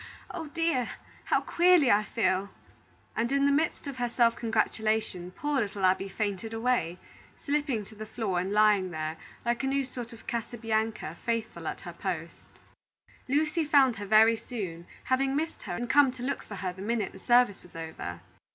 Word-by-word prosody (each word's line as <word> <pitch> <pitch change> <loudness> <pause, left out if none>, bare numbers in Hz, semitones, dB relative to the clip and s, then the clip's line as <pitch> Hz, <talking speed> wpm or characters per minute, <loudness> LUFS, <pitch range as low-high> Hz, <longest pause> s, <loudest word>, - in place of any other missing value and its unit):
Oh, 330 -4 -5
dear! 310 -6 0 0.4
how - - +2
queerly 345 -6 +5
I 205 - +5
feel 190 -1 0 0.3
" - - -34
and 235 +3 0
in 280 0 +3
the 280 - +4
midst 305 +3 +1
of 280 -2 -5
her 245 -1 -1
self 235 -1 +3
congratulation, 220 -4 0
poor 290 +7 -1
little 200 -2 -1
Abby 190 +1 +2
fainted 210 +2 -3
away, 225 -7 0 0.5
slipping 285 -6 0
to 220 - -14
the 215 0 -8
floor 200 -6 -1
and 185 +2 -2
lying 210 -3 +4
there, 155 -1 -3 0.3
like 235 +2 0
a - - +1
new 275 +1 +1
sort 250 -2 -7
of 230 - -13
Casabianca, 225 -1 -2
faithful 225 -8 -2
at - - -4
her 175 -3 -8
post. 170 -2 -5 0.8
Lucy 305 +4 +1
found 280 -6 +4
her 205 0 -6
very 220 +2 +6
soon, 180 -9 -6 0.2
having 270 +1 +1
missed 320 +3 -2
her 175 - -2
and 240 +6 -3
come 280 +1 +6
to 250 -1 -8
look 270 - -1
for 205 - -9
her 185 -1 -3
the 190 - -10
minute 215 -1 -1
the 190 - -12
service 240 -2 +4
was 180 - -18
over. 160 - -6
225 Hz, 185 wpm, -29 LUFS, 195-260 Hz, 0.8 s, very